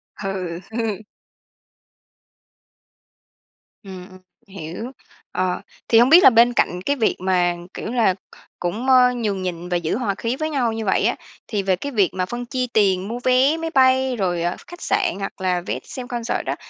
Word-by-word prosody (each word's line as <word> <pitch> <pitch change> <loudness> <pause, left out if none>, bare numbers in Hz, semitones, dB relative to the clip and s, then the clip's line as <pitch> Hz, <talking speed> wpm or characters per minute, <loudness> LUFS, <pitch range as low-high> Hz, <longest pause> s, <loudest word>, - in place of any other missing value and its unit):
Ừ, 185 -4 -4
ừ. 220 -3 -2 2.9
Ừm, 190 -1 -10
ừm, 185 0 -15 0.3
hiểu. 190 +6 -7 0.4
Ờ, 185 -1 -1 0.3
thì 225 - +5
hông 245 +3 +5
biết 345 +3 +8
là - - +10
bên 240 +1 +5
cạnh 180 -5 0
cái 285 - +1
việc 225 -5 +1
mà, 180 -2 +1 0.2
kiểu 220 - -5
là, 225 -7 +2 0.4
cũng, 210 +9 -3
ơ, 250 -1 +6
nhường 210 -6 -2
nhịn 175 -1 -5
và 175 - +1
giữ 170 +4 -2
hòa 210 -6 -1
khí 235 +5 -2
với 310 +2 -3
nhau 245 -6 0
như 225 -1 -4
vậy 190 - +2
á, - - +2 0.3
thì 205 -3 -2
về 190 -1 +2
cái 285 +10 -6
việc 200 -7 +2
mà 185 -1 -1
phân 240 +5 -5
chia 255 +1 -2
tiền 195 -3 +2
mua 235 +2 -4
vé 260 +5 +3
máy 325 0 -3
bay 260 -1 +3
rồi 175 -5 -1 0.2
khách 350 - -11
sạn 405 0 0
hoặc 195 -1 -6
là 180 -1 0
vé - - -4
xem 255 -2 -8
concert 240 -2 -3
đó, - - -2
220 Hz, 185 wpm, -21 LUFS, 185-250 Hz, 2.9 s, là